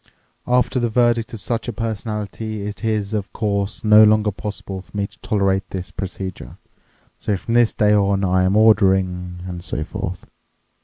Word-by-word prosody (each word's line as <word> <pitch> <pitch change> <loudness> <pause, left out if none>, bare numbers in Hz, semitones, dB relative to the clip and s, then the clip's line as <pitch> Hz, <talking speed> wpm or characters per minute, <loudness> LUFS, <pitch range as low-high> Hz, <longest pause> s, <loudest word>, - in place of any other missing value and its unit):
After 125 +1 +2
the 120 -1 0
verdict 120 -1 +2
of 115 - -8
such 115 +2 -2
a - - -1
personality 110 -1 -4
it 105 +2 -6
is, 110 -2 -1
of 105 -2 -3
course, 100 -2 -2
no 110 0 +7
longer 105 0 +4
possible 100 -1 -6
for 100 - -11
me 100 - 0
to - - -14
tolerate 100 -2 0
this 95 -1 -6
procedure. 95 -7 -6 0.6
So 105 - -1
from 115 +6 -4
this 120 -1 +4
day 105 -1 +2
on 100 -1 +2
I 95 0 +2
am 95 +2 +2
ordering... 95 -4 +3
and 90 -1 -6
so 75 -2 -3
forth. 95 0 -5
105 Hz, 170 wpm, -21 LUFS, 95-110 Hz, 0.6 s, no